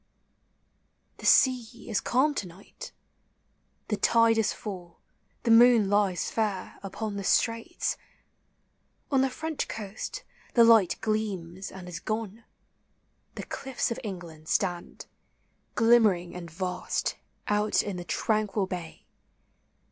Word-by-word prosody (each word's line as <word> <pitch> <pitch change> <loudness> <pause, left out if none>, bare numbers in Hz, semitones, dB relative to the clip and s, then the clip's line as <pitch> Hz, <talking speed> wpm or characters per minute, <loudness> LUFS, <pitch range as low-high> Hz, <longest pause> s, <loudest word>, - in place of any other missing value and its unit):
The - - -3
sea 245 -3 +3
is 220 -4 0
calm 275 +5 +2
to 205 - -3
night. 195 - -12 1.0
The 210 - 0
tide 230 +2 +4
is 220 - +2
full, 180 -5 -8 0.4
the 230 - +2
moon 230 -3 +6
lies 205 -3 +1
fair 210 -4 -2
Upon 200 +1 -5
the 200 - -4
straits; 230 - 0 0.6
— - - -44
on 270 -2 +4
the 265 - +2
French 315 +4 -4
coast 220 - -6 0.3
the 235 - +7
light 225 -6 +5
Gleams 195 -4 -3
and 185 -1 -10
is 175 -2 -6
gone; 220 0 -4 0.9
the - - -5
cliffs 265 -3 -3
of 235 - -3
England 170 -6 -8
stand, 175 -1 -2 0.7
Glimmering 220 -7 +4
and 175 -1 -7
vast, 180 +2 -2 0.3
out 210 +1 +2
in 200 -3 -4
the 175 - -5
tranquil 210 +1 0
bay. 175 -3 -7
210 Hz, 125 wpm, -28 LUFS, 185-230 Hz, 1.0 s, the